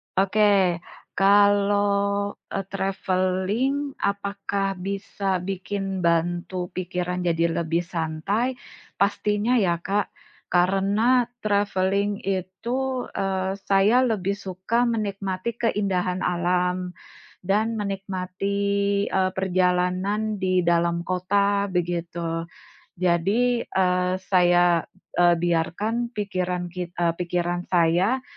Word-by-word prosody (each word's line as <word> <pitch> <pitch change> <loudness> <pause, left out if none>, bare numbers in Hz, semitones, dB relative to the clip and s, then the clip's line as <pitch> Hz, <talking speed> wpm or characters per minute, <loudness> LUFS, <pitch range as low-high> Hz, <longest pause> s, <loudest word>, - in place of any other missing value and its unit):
Oke, 195 -2 +3 0.4
kalau 200 0 +3 0.2
e - - -3
traveling 195 +8 0
apakah 200 -1 -2
bisa 195 0 -2
bikin 195 0 -3
bantu 175 +1 0
pikiran 180 0 -3
jadi 165 0 +2
lebih 170 +1 0
santai? 175 +9 -2 0.4
Pastinya 210 +4 +1
ya 180 -5 +2
Kak. 200 +2 0 0.4
Karena 200 +7 +2 0.2
traveling 200 0 0
itu, 235 +8 -2
eee, 190 0 -2
saya 200 +5 +4
lebih 200 -4 0
suka 200 +5 -1
menikmati 200 -1 -3
keindahan 190 -5 0
alam 180 +1 0 0.4
dan 215 +4 0
menikmati, 195 -1 -3 0.5
eee, 185 -1 +1
perjalanan 185 +3 0
di 185 -2 +1
dalam 170 0 +2
kota, 200 +2 +1
begitu. 170 -1 -2 0.5
Jadi, 195 +8 +1
eee, 180 -1 +1 0.2
saya, 175 -2 +4 0.3
eee, 175 0 +6
biarkan 210 +8 -1
pikiran 180 -3 -2
kit 175 0 -6
eee, 170 -1 +1
pikiran 175 0 -2
saya 180 +8 +2
190 Hz, 90 wpm, -24 LUFS, 180-205 Hz, 0.5 s, eee